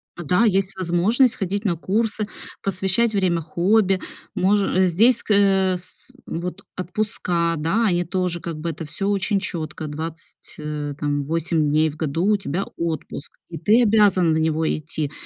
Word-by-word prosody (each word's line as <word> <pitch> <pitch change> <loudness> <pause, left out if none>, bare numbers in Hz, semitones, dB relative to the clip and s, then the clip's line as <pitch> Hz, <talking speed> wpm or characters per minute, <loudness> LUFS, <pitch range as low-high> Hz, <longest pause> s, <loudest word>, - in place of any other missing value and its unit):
Да, 180 +6 +2
есть 195 -2 +1
возможность 190 +8 +2
ходить 200 +2 -2
на 185 -6 +1
курсы, 215 +5 -1 0.4
посвящать 195 +4 +1
время 185 -4 +1
хобби, 190 +4 +2 0.3
може 200 +1 +2
э, 185 +1 +2
здесь, 225 +9 +4
ск - - -9
э, 195 -2 +4
с 175 - -7
с - - -18
вот 175 +2 -5
отпуска, 180 -3 -1
да, 165 +10 +1
они 175 -4 +2
тоже, 180 -1 -2
как 170 -1 -5
бы, 165 +2 -3
это 160 +1 -7
всё 195 +7 -3
очень 200 0 +1
чётко: 155 -4 -5
20, 160 +2 -7
э, 150 -1 -4
там, 145 -1 -1
8 160 0 0
дней 155 +2 +3
в 150 - -10
году 160 +2 -1
у 205 - +3
тебя 195 0 -3
отпуск, 160 -2 -4 0.2
и 165 - -6
ты 225 +4 +4
обязан 200 -6 +4
на 160 - +1
него 160 0 +1
идти. 155 -1 -4
180 Hz, 170 wpm, -22 LUFS, 160-200 Hz, 0.4 s, здесь